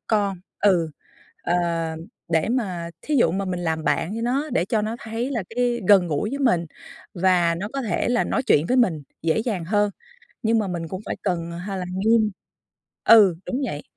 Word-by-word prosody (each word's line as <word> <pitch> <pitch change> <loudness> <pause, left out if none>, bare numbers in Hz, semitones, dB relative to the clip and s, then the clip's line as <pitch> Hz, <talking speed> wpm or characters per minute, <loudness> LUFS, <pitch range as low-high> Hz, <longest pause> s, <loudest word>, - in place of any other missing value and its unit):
con. 200 -4 0 0.2
Ừ, 175 -6 +3 0.5
ờ, 175 - 0 0.8
để 160 +5 +1
mà 185 -9 -2
thí 300 - -1
dụ 170 -10 +4
mà 195 +2 -2
mình 180 -1 -3
làm 160 -2 -1
bạn 175 +2 0
với 230 - -4
nó 275 +6 0
để 175 - +1
cho 215 0 0
nó 220 +2 -2
thấy 230 +4 -4
là 230 -7 -2
cái 240 0 0
gần 190 -3 +6
gũi 165 +7 -1
với 280 +2 -4
mình 180 -11 +2 0.5
và 175 -2 +3
nó 200 +4 -4
có 275 - -2
thể 220 +1 -1
là 245 - +2
nói - - -1
chuyện 150 - +3
với 255 - +2
mình 170 - +2 0.2
dễ 165 +3 +1
dàng 210 -8 -2
hơn, 205 +2 +1 0.5
nhưng 225 0 +3
mà 205 - -1
mình 170 -2 -4
cũng 185 +4 -6
phải - - -3
cần 170 -1 -1
hay 190 +3 -5
là 180 - -3
nghiêm. 215 +3 +2 0.7
Ừ, 205 -7 +7
đúng 260 +3 -2
vậy, 145 -10 -5
200 Hz, 200 wpm, -23 LUFS, 170-230 Hz, 0.8 s, Ừ